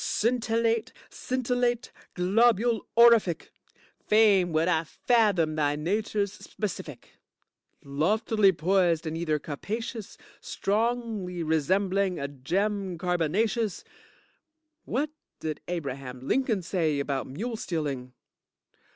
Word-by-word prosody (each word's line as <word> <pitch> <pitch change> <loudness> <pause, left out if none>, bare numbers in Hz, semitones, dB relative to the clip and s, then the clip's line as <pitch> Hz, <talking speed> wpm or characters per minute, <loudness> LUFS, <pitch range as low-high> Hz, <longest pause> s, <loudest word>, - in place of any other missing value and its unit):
Scintillate, 230 0 0 0.2
scintillate, 245 -1 -1 0.2
Globule 225 +5 +2
orific. 230 -8 +5 0.6
Fain 205 -5 +5
would 160 +2 +2
I 165 -3 +2
fathom 200 -4 +2
thy 145 -1 +1
nature's 200 +5 -1
specific. 165 - -7 0.6
Loftily 195 +8 +2
poised 175 -1 +1
in 160 0 -3
ether 165 -2 0
capacious, 215 - -5 0.2
strongly 215 -4 -2
resembling 185 +4 +1
a 140 - -2
gem 185 +7 -2
carbonacious. 185 +6 0 1.0
What 285 +5 -1 0.3
did 155 -1 -4
Abraham 135 -6 -5
Lincoln 240 -8 +1
say 160 -5 0
about 140 -1 -2
mule 225 - -4
stealing? 145 - -4
190 Hz, 90 wpm, -27 LUFS, 160-225 Hz, 1.0 s, orific